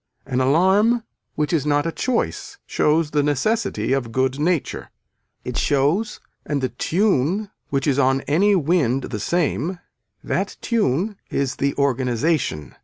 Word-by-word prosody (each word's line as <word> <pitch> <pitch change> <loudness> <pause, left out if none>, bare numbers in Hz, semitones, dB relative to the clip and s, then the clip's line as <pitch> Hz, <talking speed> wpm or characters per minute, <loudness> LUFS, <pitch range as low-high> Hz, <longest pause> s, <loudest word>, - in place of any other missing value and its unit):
An 130 +1 -1
alarm 190 - +3 0.3
which 150 +2 -1
is 155 -5 +2
not 145 0 +1
a 165 - -1
choice 255 - -2
shows 150 0 +1
the 150 - +2
necessity 145 - 0
of 125 -4 -1
good 130 +2 0
nature. 165 0 -1 0.6
It - - -4
shows 150 +11 +1 0.2
and 145 -2 -2
the 130 -1 -1
tune 190 - 0 0.2
which 140 -1 -1
is 140 -2 +2
on 135 0 +3
any 195 +9 +3
wind 145 -6 +1
the 110 - -3
same, 170 - -1 0.5
that - - -2
tune 205 - 0
is 135 -2 -1
the 140 0 0
organization. 130 - 0
145 Hz, 140 wpm, -22 LUFS, 135-185 Hz, 0.6 s, alarm